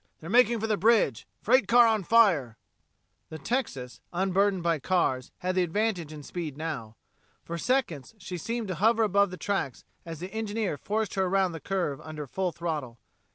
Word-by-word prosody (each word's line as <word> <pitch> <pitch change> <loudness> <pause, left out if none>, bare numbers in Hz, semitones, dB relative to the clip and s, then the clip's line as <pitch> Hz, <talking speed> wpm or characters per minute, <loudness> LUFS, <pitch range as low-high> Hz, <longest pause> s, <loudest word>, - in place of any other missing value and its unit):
They're 165 +3 -8
making 240 -1 +5
for 220 - -2
the 215 -2 0
bridge 205 - +2 0.2
freight 240 -1 +4
car 240 +3 +7
on 220 -3 +2
fire!" 170 - +3 0.7
The 160 - -7
Texas, 140 - -3
unburdened 190 +1 +1
by 165 -2 +1
cars, 135 -5 0
had 185 - +1
the 185 - +2
advantage 180 -2 -1
in 150 -1 -9
speed 155 -3 -5
now. 150 -9 -5 0.5
For 170 0 -5
seconds 225 - -1
she 180 -3 -6
seemed 230 +2 -3
to - - -1
hover 225 +1 +4
above 200 -1 +3
the 185 - -8
tracks 195 - -3 0.2
as 165 -2 -8
the 185 +3 -7
engineer 220 -4 -2
forced 215 +6 -2
her 190 -1 +1
around 190 0 +2
the 165 - -7
curve 175 -7 -2
under 155 -1 -7
full 185 +6 -2
throttle. 155 -8 -4
185 Hz, 180 wpm, -28 LUFS, 155-215 Hz, 0.7 s, car